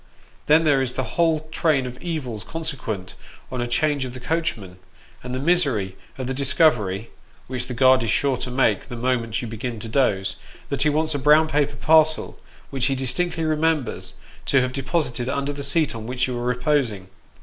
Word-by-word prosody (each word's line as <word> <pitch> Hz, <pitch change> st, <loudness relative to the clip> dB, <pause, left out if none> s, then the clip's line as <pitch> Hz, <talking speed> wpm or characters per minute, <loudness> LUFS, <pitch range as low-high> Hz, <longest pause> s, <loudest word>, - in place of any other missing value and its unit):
Then 155 Hz, +2 st, +5 dB
there 145 Hz, -4 st, +3 dB
is 125 Hz, -2 st, -1 dB
the 130 Hz, -, -2 dB
whole 165 Hz, -2 st, +2 dB
train 155 Hz, -5 st, +1 dB
of 125 Hz, 0 st, -8 dB
evils 140 Hz, -11 st, -4 dB
consequent 135 Hz, -, -5 dB, 0.4 s
on 130 Hz, -1 st, -3 dB
a 120 Hz, -, -1 dB
change 140 Hz, +4 st, +1 dB
of 125 Hz, -1 st, -6 dB
the -, -, -7 dB
coachman; 120 Hz, -, -3 dB, 0.4 s
and 125 Hz, 0 st, -4 dB
the -, -, -2 dB
misery 135 Hz, -, +1 dB, 0.2 s
of 130 Hz, -, -4 dB
the 130 Hz, -, -2 dB
discovery 125 Hz, -, +2 dB, 0.3 s
which 125 Hz, -1 st, -4 dB
the 125 Hz, -, -5 dB
guard 130 Hz, +1 st, +5 dB
is 115 Hz, -, -2 dB
sure 140 Hz, +2 st, +2 dB
to 125 Hz, -, -3 dB
make 125 Hz, -6 st, +1 dB
the 120 Hz, -, -7 dB
moment 120 Hz, -1 st, -1 dB
you -, -, -4 dB
begin 115 Hz, +1 st, -5 dB
to 115 Hz, -, -5 dB
doze 110 Hz, -6 st, +1 dB, 0.3 s
that 140 Hz, -, -2 dB
he 150 Hz, -, +4 dB
wants 155 Hz, +1 st, 0 dB
a 145 Hz, -, -1 dB
brown 150 Hz, +3 st, +5 dB
paper 150 Hz, -2 st, 0 dB
parcel, 155 Hz, 0 st, +3 dB, 0.3 s
which 135 Hz, -2 st, 0 dB
ho 135 Hz, -, 0 dB
distinctly 160 Hz, +6 st, 0 dB
remembers 155 Hz, -4 st, 0 dB, 0.3 s
to 135 Hz, -, +4 dB
have 125 Hz, 0 st, -2 dB
deposited 130 Hz, -3 st, -1 dB
under 140 Hz, +1 st, -1 dB
the 140 Hz, -, -6 dB
seat 145 Hz, +2 st, +1 dB
on 115 Hz, -1 st, -7 dB
which 125 Hz, 0 st, 0 dB
you 125 Hz, -, -3 dB
are 120 Hz, 0 st, -3 dB
reposing. 125 Hz, -6 st, 0 dB
130 Hz, 195 wpm, -23 LUFS, 120-150 Hz, 0.4 s, Then